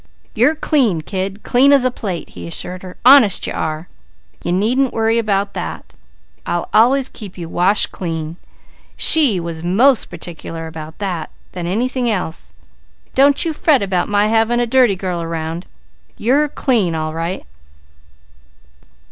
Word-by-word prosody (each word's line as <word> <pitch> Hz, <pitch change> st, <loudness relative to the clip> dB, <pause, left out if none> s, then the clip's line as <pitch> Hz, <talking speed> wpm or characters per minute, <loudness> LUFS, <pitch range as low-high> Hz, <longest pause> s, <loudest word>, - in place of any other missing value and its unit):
"You're 255 Hz, +8 st, +2 dB
clean 255 Hz, -, +1 dB
kid, 195 Hz, +4 st, -5 dB
clean 265 Hz, +3 st, +4 dB
as 275 Hz, -3 st, +4 dB
a 255 Hz, -, +2 dB
plate!" 190 Hz, -8 st, -5 dB
he 85 Hz, -1 st, -9 dB
assured 180 Hz, -, -4 dB
her. 185 Hz, -1 st, -11 dB
"Honest 255 Hz, -7 st, +6 dB
you -, -, -4 dB
are! 155 Hz, +2 st, -4 dB, 0.6 s
You 175 Hz, -, -2 dB
needn't 240 Hz, +8 st, +1 dB
worry 225 Hz, +1 st, +1 dB
about 200 Hz, -2 st, -1 dB
that. -, -, -7 dB, 0.5 s
I'll -, -, -3 dB
always 255 Hz, +4 st, +4 dB
keep 200 Hz, -5 st, -10 dB
you 170 Hz, -2 st, -6 dB
washed 185 Hz, +5 st, +2 dB
clean. 165 Hz, -2 st, -5 dB, 0.6 s
She 275 Hz, -, +6 dB
was 165 Hz, -1 st, -6 dB
more 205 Hz, +11 st, +4 dB, 0.2 s
particular 165 Hz, -1 st, -8 dB
about 160 Hz, 0 st, -9 dB
that 185 Hz, -6 st, -4 dB, 0.2 s
than 175 Hz, -2 st, -5 dB
anything 245 Hz, +5 st, -1 dB
else. 180 Hz, -6 st, -4 dB, 0.6 s
Don't 280 Hz, +3 st, +3 dB
you 325 Hz, -, -1 dB
fret 295 Hz, -6 st, +2 dB
about 185 Hz, -3 st, -1 dB
my 205 Hz, 0 st, +2 dB
having 225 Hz, +2 st, +2 dB
a 240 Hz, -, +1 dB
dirty 245 Hz, -3 st, +3 dB
girl 180 Hz, -2 st, -4 dB
around! 165 Hz, +1 st, -5 dB, 0.5 s
You're 275 Hz, +7 st, +2 dB
clean, 220 Hz, -, 0 dB
all 155 Hz, 0 st, -3 dB
right!" 165 Hz, +3 st, -4 dB
200 Hz, 150 wpm, -17 LUFS, 170-245 Hz, 0.6 s, Honest